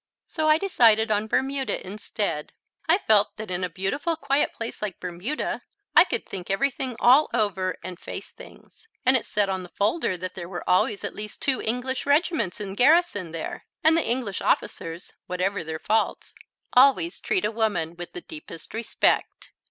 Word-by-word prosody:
So 310 -2 -1
I 310 - +6
decided 230 - +4
on 210 +1 +1
Bermuda 270 +3 -1
instead. 200 -5 -3 0.4
I 335 - +6
felt 215 - +3
that 215 -3 -6
in 180 +1 -1
a 180 - -1
beautiful, 235 - -1
quiet 280 -2 +1
place 230 0 -6
like 210 -4 -4
Bermuda 185 - -3 0.3
I - - +9
could 465 - -3
think 180 -2 -7
everything 255 +4 -1
all 265 +5 +6
over 190 -5 0
and 180 0 -7
face - - -7
things, 445 - -16 0.2
and 260 +1 +5
it 255 - 0
said 205 -2 +1
on 190 -1 -2
the 180 - -10
folder 205 - 0
that 185 +1 -5
there 175 -2 -7
were 175 -3 -6
always 185 +2 +2
at - - -3
least 210 0 -7
two 270 -2 +1
English 250 +4 -2
regiments 285 - +1
in 200 -2 -5
garrison 250 - +3
there, 165 -1 -6 0.2
and 320 +1 +6
the 330 - +3
English 235 -5 -2
officers, 165 +2 -1
whatever 185 +1 -1
their 160 0 -4
faults, 220 +7 -1 0.4
always 275 +6 +4
treat 380 - 0
a 210 - 0
woman 210 -8 -1
with 175 0 -8
the 175 - -6
deepest 155 +1 -10
respect. 225 +1 0
215 Hz, 175 wpm, -25 LUFS, 185-270 Hz, 0.4 s, I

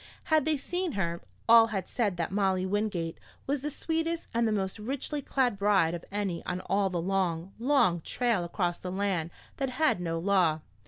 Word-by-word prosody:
Had 310 -3 +5
they 315 -1 +2
seen 355 +3 -2
her, 170 -3 -2 0.3
all 230 0 +8
had 195 -5 -3
said 205 -7 -1
that 170 0 -2
Molly 190 -2 +1
Wingate 190 -4 -1 0.3
was 280 0 -1
the 295 - -2
sweetest 325 +2 -2
and 230 0 +2
the - - +1
most 195 0 -2
richly 275 +6 -3
clad 250 -6 0
bride 195 -5 +3
of 170 - -5
any 200 -4 -2
on 180 0 -2
all 195 +1 +1
the 180 -2 -2
long, 180 -1 -1
long 230 - +3
trail 235 -1 0
across 175 0 -1
the 180 - -5
land 190 -4 -1 0.3
that 270 -2 -1
had 255 - +1
no 165 -1 -2
law. 170 -3 +2
200 Hz, 190 wpm, -29 LUFS, 180-250 Hz, 0.3 s, all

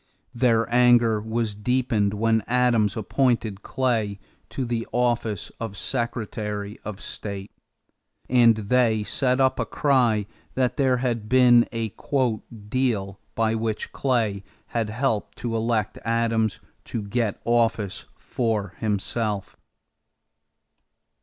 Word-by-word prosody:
Their 115 -2 +2
anger 120 -3 +5
was 110 0 -2
deepened 105 -2 0
when 110 +1 +2
Adams 120 -4 +2
appointed 110 -2 0
Clay 115 -6 -1 0.3
to 130 - -3
the 115 -1 -2
office 120 -4 0
of 110 -3 -5
Secretary 105 -4 -3
of 105 -2 -6
State; 100 -1 -6 0.8
and 120 -2 +5
they 110 0 +2
set 130 +4 +1
up 130 -1 +3
a 115 - +1
cry 120 -8 +2 0.3
that 125 -1 +1
there 130 -2 +3
had 120 -4 -2
been 125 -2 +6
a 115 -3 -3 0.7
"deal" 105 -5 -1 0.2
by 110 -1 +1
which 110 -1 -2
Clay 110 -7 0 0.3
had 115 -2 -1
helped 115 -1 -1
to 120 -1 -3
elect 110 -2 -1
Adams 115 -2 +1 0.3
to 115 - -4
get 105 +1 -1
office 115 -4 +1
for 110 -5 -2
himself. 105 -1 -2
115 Hz, 115 wpm, -24 LUFS, 105-125 Hz, 0.8 s, been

